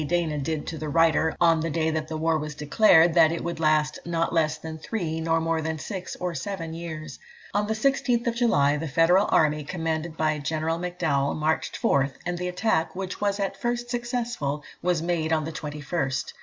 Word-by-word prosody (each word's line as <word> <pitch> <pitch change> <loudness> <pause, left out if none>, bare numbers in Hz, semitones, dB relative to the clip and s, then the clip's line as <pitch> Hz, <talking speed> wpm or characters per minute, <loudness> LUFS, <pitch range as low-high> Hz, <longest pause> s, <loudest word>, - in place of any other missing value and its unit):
Dana 165 -3 0
did 155 +1 -2
to 160 - -5
the 155 - -4
writer, 160 +1 +3
on 165 -2 +4
the 165 +1 -1
day 160 0 0
that 155 0 -3
war 160 0 0
was 150 0 -5
declared 160 +2 +5
that 160 -2 +6
it 170 - -3
would 170 -1 -4
last 155 -1 +2
"not 165 -1 -1
less 155 -2 +2
than 160 0 -7
three, 160 -4 -3
nor 165 0 +2
more 165 0 0
than 160 0 -2
six 185 +3 -6
or 180 -1 -3
seven 165 +2 -4
years." 160 -2 -7 0.3
On 205 +1 +1
the 220 - 0
16th 240 -1 +1
July, 150 - +3
the 160 +2 -3
Federal 165 +7 +4
army, 150 -1 +3
commanded 160 0 -3
by 155 -1 +1
General 160 +3 -1
M'Dowell, 165 -6 0
marched 155 +1 -1
forth, 135 0 +1
and 175 0 -2
the 180 - -2
attack, 180 -2 0
which 190 +1 -5
was 200 0 0
at 195 -1 -3
first 240 0 -2
successful, 240 - -2 0.2
was 175 -2 +1
made 165 -2 -1
on 160 -1 +2
the 160 - -4
21st. 145 -3 -3
165 Hz, 195 wpm, -26 LUFS, 155-180 Hz, 0.3 s, that